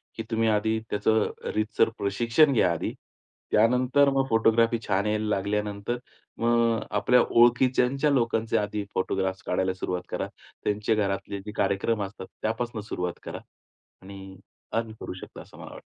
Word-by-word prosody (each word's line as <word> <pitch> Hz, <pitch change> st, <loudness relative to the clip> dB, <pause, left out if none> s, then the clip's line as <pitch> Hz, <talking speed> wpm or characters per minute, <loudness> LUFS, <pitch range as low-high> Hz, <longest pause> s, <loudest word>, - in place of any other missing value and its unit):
की 115 Hz, -, -4 dB
तुम्ही 115 Hz, 0 st, +2 dB
आधी 110 Hz, +1 st, +1 dB
त्याचं 105 Hz, +1 st, +2 dB, 0.2 s
रीतसर 110 Hz, +1 st, +2 dB
प्रशिक्षण 120 Hz, +9 st, +3 dB
घ्या 90 Hz, -7 st, +3 dB
आधी. 80 Hz, -, -3 dB, 0.6 s
त्यानंतर 125 Hz, +5 st, +4 dB
मग 135 Hz, 0 st, +2 dB
फोटोग्राफी 115 Hz, +1 st, +3 dB
छान 95 Hz, +2 st, +1 dB
यायला 105 Hz, 0 st, 0 dB
लागल्यानंतर 105 Hz, +3 st, -2 dB, 0.4 s
मग 115 Hz, -1 st, +3 dB, 0.2 s
आपल्या 125 Hz, +4 st, +4 dB
ओळखीच्या 125 Hz, +4 st, +3 dB
लोकांचे 115 Hz, -4 st, +1 dB
आधी 105 Hz, 0 st, -2 dB
फोटोग्राफ्स 95 Hz, 0 st, -1 dB
काढायला 95 Hz, +1 st, 0 dB
सुरुवात 90 Hz, -1 st, -3 dB
करा. -, -, -3 dB, 0.4 s
त्यांचे 105 Hz, +2 st, 0 dB
घरातले 100 Hz, -1 st, -2 dB
जे 105 Hz, -, -5 dB
कार्यक्रम 105 Hz, +2 st, +1 dB
असतात 95 Hz, -1 st, -7 dB, 0.2 s
त्यापासून 115 Hz, 0 st, -2 dB
सुरुवात 90 Hz, -4 st, -4 dB
करा. -, -, -6 dB, 0.6 s
आणि 95 Hz, 0 st, -10 dB, 0.4 s
अर्न 115 Hz, -1 st, -1 dB
करू -, -, -5 dB
शकता -, -, -10 dB
असं -, -, -16 dB
मला -, -, -9 dB
वाटतं. -, -, -10 dB
110 Hz, 145 wpm, -26 LUFS, 100-115 Hz, 0.6 s, त्यानंतर